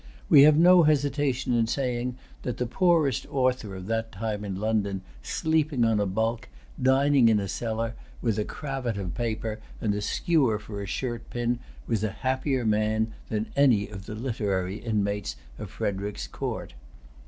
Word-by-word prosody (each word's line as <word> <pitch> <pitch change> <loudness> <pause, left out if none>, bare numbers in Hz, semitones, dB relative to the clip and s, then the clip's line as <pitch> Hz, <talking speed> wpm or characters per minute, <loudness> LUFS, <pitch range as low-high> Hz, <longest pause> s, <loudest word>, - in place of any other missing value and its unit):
We 140 - +9
have 150 +1 +7
no 180 +2 +7
hesitation 145 -4 +1
in 115 -1 +2
saying 125 0 -1 0.2
that 125 - -3
the 125 - -1
poorest 160 - +2
author 125 -6 0
of 95 -1 -7
that 115 +1 -2
time 105 +1 -3
in 100 -2 -4
London, 100 -2 -1 0.2
sleeping 155 - +1
on 110 -2 +2
a 100 - +1
bulk, 110 - -1 0.3
dining 135 -1 +5
in 110 -2 +4
a 100 - -3
cellar, 115 +2 -2 0.3
with 110 -3 0
a - - +1
cravat 135 -4 -4
of 95 -4 -4
paper, 110 -2 -3 0.2
and 105 -2 0
a 105 - -2
skewer 135 - +2
for 105 -1 -7
a 100 - -5
shirt 120 +4 -4
pin, 120 0 -1 0.3
was 110 - -1
a 110 - +1
happier 130 -1 0
man 110 +1 +1 0.2
than 110 0 -2
any 125 -8 +4
of 95 -2 -9
the 105 - -5
literary 105 -5 -2
inmates 105 - -1 0.2
of - - -6
Frederic's 100 +1 -3
court. - - -5
115 Hz, 165 wpm, -27 LUFS, 105-130 Hz, 0.3 s, We